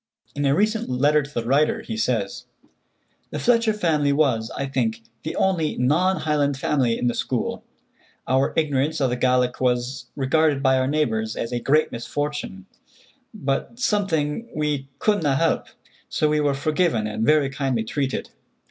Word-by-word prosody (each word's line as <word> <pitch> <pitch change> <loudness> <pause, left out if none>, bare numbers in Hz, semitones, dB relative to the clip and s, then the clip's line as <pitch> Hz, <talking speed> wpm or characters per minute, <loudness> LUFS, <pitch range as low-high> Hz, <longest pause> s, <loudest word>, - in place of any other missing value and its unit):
In 145 0 -2
a 135 - +3
recent 215 - 0
letter 145 +4 +3
to 140 0 -9
the 120 -5 -3
writer, 140 +5 +2
he 110 - -5
says: 110 -3 -1 0.8
"The - - -5
Fletcher 230 -2 +3
family 160 -9 +1
was, 130 -7 +1
I 140 - -1
think, 115 -5 -1 0.2
the 160 - -5
only 175 -5 +1
non 170 +9 +2
Highland 145 -3 +1
family 130 -4 +1
in - - -2
the 120 - +2
school. - - -2 0.6
Our 130 +1 +2
ignorance 155 0 +1
of 135 -3 +1
the - - 0
Gaelic 125 0 +1
was 125 0 -1
regarded 145 +1 +2
by 130 -1 +4
our 130 - +1
neighbors 110 -7 0
as 115 - -4
a 120 - -1
great 150 +6 +2
misfortune, 120 -4 -4 0.7
but 135 +11 -3
something 195 - 0
we 150 -3 -1
'couldna 180 -10 +1
help,' 165 +3 +1 0.4
so 155 - +1
we 150 0 +2
were 145 -2 +1
forgiven 150 -5 +1
and 105 +1 -2
very 145 +1 +3
kindly 135 -5 -1
treated. 135 +4 -3
140 Hz, 160 wpm, -23 LUFS, 125-155 Hz, 0.8 s, by